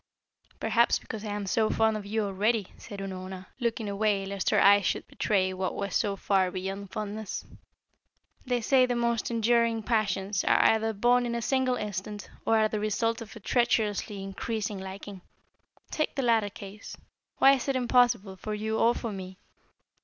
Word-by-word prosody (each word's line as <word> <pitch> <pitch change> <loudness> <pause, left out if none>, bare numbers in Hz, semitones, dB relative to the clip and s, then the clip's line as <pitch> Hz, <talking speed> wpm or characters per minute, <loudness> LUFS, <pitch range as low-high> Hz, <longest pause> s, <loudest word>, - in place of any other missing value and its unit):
"Perhaps 235 0 +3
because 220 -1 -8
I 215 - -5
am 205 -1 -3
so 215 +3 +1
fond 220 0 +2
of 205 -1 -5
you 220 +1 0
already," 205 +1 0
said 205 -3 -9
Unorna, 185 -1 -6
looking 230 -2 -1
away 200 -1 0
lest 195 -1 -2
her - - +3
eyes 200 0 +6
should - - -1
betray 190 -3 0
what 185 0 -3
was 200 -2 -3
so 205 -3 +1
far 190 -1 +1
beyond 195 +2 -5
fondness. 215 +1 -5 1.0
"They 245 -2 -1
say 255 +2 +4
that 245 - 0
the - - -1
most 235 -1 0
enduring 230 -1 +2
passions 205 -3 0
are - - +4
either 225 0 +3
born 245 +4 +3
in 235 - -2
a 235 - -2
single 260 0 +1
instant, 205 -1 -5 0.2
or 225 - +4
are 215 0 +4
the 215 0 -3
result 225 +2 0
of 225 0 -9
a - - -9
treacherously 210 -3 0
increasing 205 +1 -3
liking. 190 0 -8 0.7
Take 310 - -1
the 275 - -1
latter 225 -4 +3
case. 200 +1 -10 0.4
Why 270 - +7
is 265 -1 -2
it 275 - +1
impossible, 240 -6 +2
for 215 +2 -4
you 220 +1 -2
or 235 +1 +4
for 230 - -4
me? 190 -1 -7
215 Hz, 180 wpm, -28 LUFS, 195-230 Hz, 1.0 s, Why